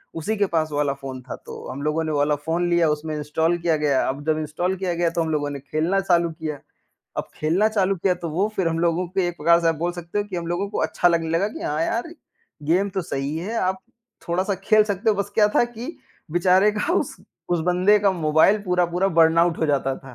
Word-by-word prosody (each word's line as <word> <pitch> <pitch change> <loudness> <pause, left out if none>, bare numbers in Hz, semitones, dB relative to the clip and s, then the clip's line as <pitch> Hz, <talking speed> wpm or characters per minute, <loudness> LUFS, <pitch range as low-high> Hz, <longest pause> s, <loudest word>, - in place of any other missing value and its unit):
उसी 165 +7 -2
के 200 - +3
पास 155 -1 +1
वो 145 - -3
वाला 145 -2 +1
फ़ोन 135 -2 -8
था, 130 - -7
तो - - -10
हम 135 +2 -6
लोगों 155 +2 0
ने 155 - -2
वो 145 - 0
वाला 145 +1 +2
फ़ोन 165 +4 -1
लिया 170 -2 +3
उसमें 150 +1 -2
इंस्टॉल 160 +3 0
किया 165 -2 +1
गया, 145 -3 +1
अब 140 +2 -4
जब 155 0 +2
इंस्टॉल 160 +5 -2
किया 180 -2 -2
गया, 170 0 +1
तो 170 - -1
हम 160 - -3
लोगों 145 -1 -1
ने 140 - -5
खेलना 155 +7 0
चालू 170 -3 +2
किया। 155 -3 -5 0.6
अब - - -3
खेलना 175 +8 +2
चालू 195 -3 +1
किया 180 +1 +1
तो 170 -1 -6
वो 190 +7 0
फिर 180 -4 +1
हम 165 0 -2
लोगों 170 +1 +1
को 190 +1 -1
एक 175 -1 -1
प्रकार 170 +3 +4
से 165 - +2
आप 165 - +2
बोल 175 +3 -1
सकते 175 +3 -5
हो 205 - 0
कि 195 -3 -6
हम 170 -1 -4
लोगों 185 +4 -1
को - - -4
अच्छा 175 - +2
लगने 165 -1 0
लगा, 180 +5 +1
कि - - -8
हाँ, 150 +2 -1
यार 240 +9 -3 0.5
गेम 180 +6 +2
तो 190 -1 -2
सही 140 0 -3
है। 210 +7 -4
आप 185 +1 0 0.5
थोड़ा-सा 185 +4 0
खेल 215 0 +5
सकते 205 +2 0
हो, 210 - +2
बस 200 0 -2
क्या 210 -2 +5
था - - +5
कि 240 +7 -8 0.4
बेचारे 185 +4 +4
का 215 +11 -1
उस - - -1 0.4
उस 175 - +1
बंदे 185 +4 +4
का 200 -1 +3
मोबाइल 160 +4 +3
पूरा-पूरा 180 0 +1
बर्नआउट 165 +1 +4
हो 160 - +1
जाता 135 -2 0
था। 135 -2 -13
170 Hz, 245 wpm, -23 LUFS, 155-190 Hz, 0.6 s, खेल